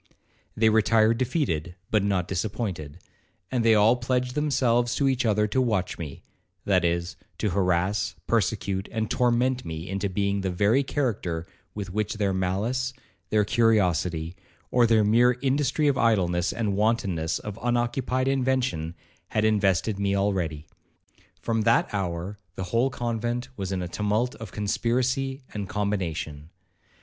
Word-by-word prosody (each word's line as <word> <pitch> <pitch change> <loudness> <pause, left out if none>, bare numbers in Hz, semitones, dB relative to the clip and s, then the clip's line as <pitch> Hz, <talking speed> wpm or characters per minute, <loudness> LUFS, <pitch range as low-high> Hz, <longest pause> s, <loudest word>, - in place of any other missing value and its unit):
They 110 0 +4
retired 110 +1 +3
defeated, 90 - -1 0.2
but 110 - +3
not 95 -3 0
disappointed, 95 -6 -3 0.5
and 125 -3 +1
they 115 -1 +5
all 110 +3 +5
pledged 125 0 -1
themselves 120 -5 +1
to 140 - +2
each 130 -3 +1
other 105 0 +3
to 130 - +1
watch 105 -9 -1
me; 75 -4 -7 0.4
that - - +3
is, 85 0 -1 0.2
to 105 - -1
harass, 95 +2 +1
persecute, 100 -3 0
and 110 0 -2
torment 125 +1 +2
me 80 +1 -6
into 100 +1 -2
being 100 +1 0
the 95 - -1
very 100 +8 +3
character 105 - -2 0.3
with 100 -3 -5
which 105 +1 -1
their 100 -2 0
malice, 105 +8 -1 0.4
their 105 -1 +3
curiosity, 90 - +1 0.4
or 120 -1 +4
their 110 -2 +4
mere 120 +4 +4
industry 140 +2 +1
of 140 -2 +2
idleness 90 -6 +2
and 110 -4 -1
wantonness 100 -7 0
of 105 +1 -7
unoccupied 120 +2 0
invention, 130 -11 0 0.3
had 110 0 0
invested 100 -1 +2
me 100 0 +1
already. 90 -7 -1 0.8
From 115 -1 0
that 105 - +2
hour 95 0 -3 0.2
the 95 - -4
whole 120 +3 +3
convent 120 0 -3
was 95 -3 -4
in 95 -2 -1
a - - -3
tumult 105 +6 0
of 110 -4 -8
conspiracy 130 +6 -1
and 100 -3 -4
combination. 85 -7 -3
105 Hz, 145 wpm, -26 LUFS, 95-120 Hz, 0.8 s, they